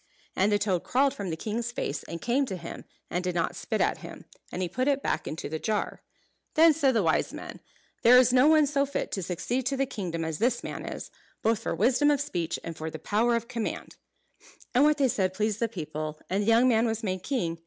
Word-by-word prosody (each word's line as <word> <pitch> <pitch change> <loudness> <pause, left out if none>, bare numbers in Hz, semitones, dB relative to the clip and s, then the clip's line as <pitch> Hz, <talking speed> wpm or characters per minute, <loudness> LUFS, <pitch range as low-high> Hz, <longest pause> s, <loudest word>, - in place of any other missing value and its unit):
And 200 +3 +2
the 205 - +4
toad 195 -4 0
crawled 275 +2 +2
from 200 -3 -5
the 160 - -3
king's 230 +5 -3
face 160 - -3
and 170 - -7
came 260 +3 +1
to 190 -5 -4
him, 170 -1 -8 0.3
and 175 +1 -1
did 180 -1 -2
not 165 -1 0
spit - - -3
at - - +1
him; - - -10 0.3
and 185 - -3
he - - 0
put 255 +9 -1
it 280 -1 +1
back - - -1
into 160 - -4
the 160 +2 -4
jar. 215 +2 -2 0.5
Then 325 0 +7
said 275 -5 +2
the 220 - +3
wise 160 -1 +1
men, - - -8 0.4
"There 245 +2 +8
is 250 -1 +5
no 255 +3 +6
one 310 -1 +6
so 280 0 +1
fit 280 0 -3
to 195 - -2
succeed 230 +9 -2
to 275 0 0
the 270 - +2
kingdom 175 -9 -4
as 160 -1 -3
this 240 +1 +1
man - - -6
is; - - -6 0.3
both 225 -1 +2
for - - -3
wisdom 270 +4 +3
of 290 -1 +3
speech 175 - -2
and 165 - -6
for 160 0 -5
the 160 - -7
power 220 +8 +1
of 235 0 -2
command." 235 -3 -4 0.8
And 255 +3 +5
what 300 0 +4
they 275 -2 +3
said 190 -5 0
pleased 215 0 0
the 230 - +1
people; 155 -5 -5
and 195 +2 +1
the 205 - -2
young 230 +2 +5
man 230 -1 +3
was 225 +1 -2
made 185 -3 -2
king. 175 -9 -2
220 Hz, 240 wpm, -28 LUFS, 180-255 Hz, 0.8 s, There